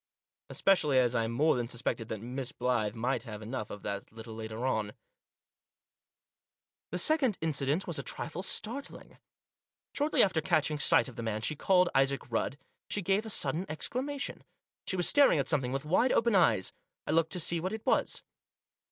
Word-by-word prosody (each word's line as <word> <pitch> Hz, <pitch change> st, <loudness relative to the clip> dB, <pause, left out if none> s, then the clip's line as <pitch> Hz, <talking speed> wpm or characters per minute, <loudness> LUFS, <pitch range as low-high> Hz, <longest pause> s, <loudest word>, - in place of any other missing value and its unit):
Especially 155 Hz, -8 st, +3 dB
as 125 Hz, -1 st, +3 dB
I 115 Hz, -2 st, +1 dB
more 145 Hz, +8 st, +2 dB
than 120 Hz, -1 st, -2 dB
suspected 115 Hz, -1 st, -2 dB
that 110 Hz, -2 st, -4 dB
Miss 130 Hz, +2 st, -4 dB
Blyth 120 Hz, -5 st, -1 dB
might 125 Hz, +2 st, -1 dB
have 110 Hz, -2 st, -8 dB
enough 110 Hz, -1 st, -5 dB
of 105 Hz, -, -8 dB
that 100 Hz, 0 st, -5 dB
a -, -, -24 dB
little 110 Hz, 0 st, -9 dB
later 110 Hz, +2 st, -5 dB
on. 110 Hz, -5 st, -1 dB, 2.0 s
The 180 Hz, -, -3 dB
second 265 Hz, -, +3 dB
incident 150 Hz, +2 st, 0 dB
was 170 Hz, -3 st, -3 dB
a -, -, -1 dB
trifle 170 Hz, -, -5 dB
startling. 225 Hz, +7 st, -4 dB, 0.7 s
Shortly 295 Hz, +2 st, +3 dB
after 185 Hz, -5 st, +1 dB
catching 155 Hz, -1 st, +1 dB
sight -, -, +4 dB
of 130 Hz, -1 st, -11 dB
the -, -, -4 dB
man 110 Hz, -2 st, -2 dB
she 155 Hz, +7 st, -1 dB
called 180 Hz, +3 st, +3 dB
Isaac 135 Hz, -1 st, +1 dB
Rudd, 120 Hz, +4 st, -1 dB, 0.3 s
she 205 Hz, -, -2 dB
gave 195 Hz, +5 st, +1 dB
a -, -, -5 dB
sudden 165 Hz, -1 st, +1 dB
exclamation. 270 Hz, -, -3 dB, 0.4 s
She 190 Hz, -, -1 dB
was 180 Hz, -2 st, +3 dB
staring 285 Hz, -, +6 dB
at 135 Hz, -2 st, 0 dB
something 135 Hz, -5 st, 0 dB
with 135 Hz, +2 st, -3 dB
wide 185 Hz, +11 st, +3 dB
open 235 Hz, 0 st, +3 dB
eyes. 115 Hz, -, +3 dB, 0.3 s
I -, -, -2 dB
looked 165 Hz, +2 st, +2 dB
to 180 Hz, -, -2 dB
see 170 Hz, +1 st, +1 dB
what 185 Hz, +3 st, -3 dB
it 220 Hz, 0 st, -6 dB
was. -, -, +1 dB
145 Hz, 180 wpm, -31 LUFS, 115-185 Hz, 2.0 s, staring